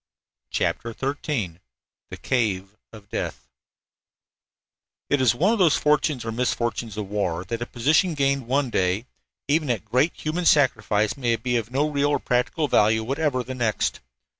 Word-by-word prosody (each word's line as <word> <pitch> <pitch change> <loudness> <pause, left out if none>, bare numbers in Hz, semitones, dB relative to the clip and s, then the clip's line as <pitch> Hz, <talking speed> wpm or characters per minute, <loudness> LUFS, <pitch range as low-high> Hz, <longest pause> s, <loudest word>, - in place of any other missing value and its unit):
CHAPTER 115 -1 -2
XIII 135 - -2 0.5
THE - - -7
CAVE 105 -6 -1 0.2
OF 105 -2 -13
DEATH - - -4 1.6
It 145 -1 +3
is 125 -2 +4
one 190 - +3
of 230 - -1
the 180 -3 +6
fortunes, 150 -4 +1
or 115 - -2
misfortunes, 120 -2 -2
of 105 -2 -3
war 95 -4 -2
that 115 +5 -4
a 120 - -3
position 155 +8 +2
gained 140 -3 0
one 135 0 +1
day, 95 +4 0 0.4
even 150 0 +1
at 115 -3 -1
great 130 +9 +2
human 165 +3 -2
sacrifice, 110 -7 +3
may 120 -4 +1
be 125 +2 -2
of 115 -1 -1
no 140 +4 +1
real 145 -1 +1
or 145 - +1
practical 125 +5 0
value 110 -3 +3
whatever 135 +1 -1
the 130 - -6
next. 120 -4 -1
125 Hz, 160 wpm, -24 LUFS, 110-145 Hz, 1.6 s, the